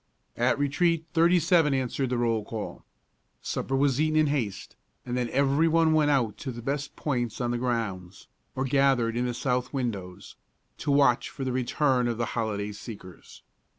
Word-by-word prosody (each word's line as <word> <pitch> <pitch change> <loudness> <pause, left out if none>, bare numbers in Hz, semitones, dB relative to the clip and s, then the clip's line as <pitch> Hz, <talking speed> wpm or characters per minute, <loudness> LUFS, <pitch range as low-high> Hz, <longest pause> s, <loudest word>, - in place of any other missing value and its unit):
At - - +2
retreat 160 +3 +1
thirty 170 +2 +4
seven 165 -4 +3
answered 130 0 -1
the 125 - 0
roll 115 -2 +1
call. 110 0 -6 0.6
Supper 135 - -3
was 135 0 +2
eaten 155 0 +1
in 155 - +5
haste, 130 -10 -3 0.3
and 125 - -3
then 125 -1 -1
every 140 +4 +2
one 165 0 +3
went 155 -2 +3
out 125 -7 +1
to 135 - -4
the 120 -1 -8
best 140 +2 -3
points 120 -6 -2
on 120 -1 -1
the 120 - -1
grounds, 100 -8 -3 0.3
or 130 - -1
gathered 135 -4 +2
in 125 +1 0
the 120 - -2
south 125 0 -1
windows, 100 -9 -5 0.4
to - - -4
watch 140 -4 +3
for 135 - -7
the 130 - -1
return 130 0 +1
of 120 -2 -2
the 115 - 0
holiday 105 -3 -2
seekers. 100 -4 -11
125 Hz, 180 wpm, -27 LUFS, 115-145 Hz, 0.6 s, in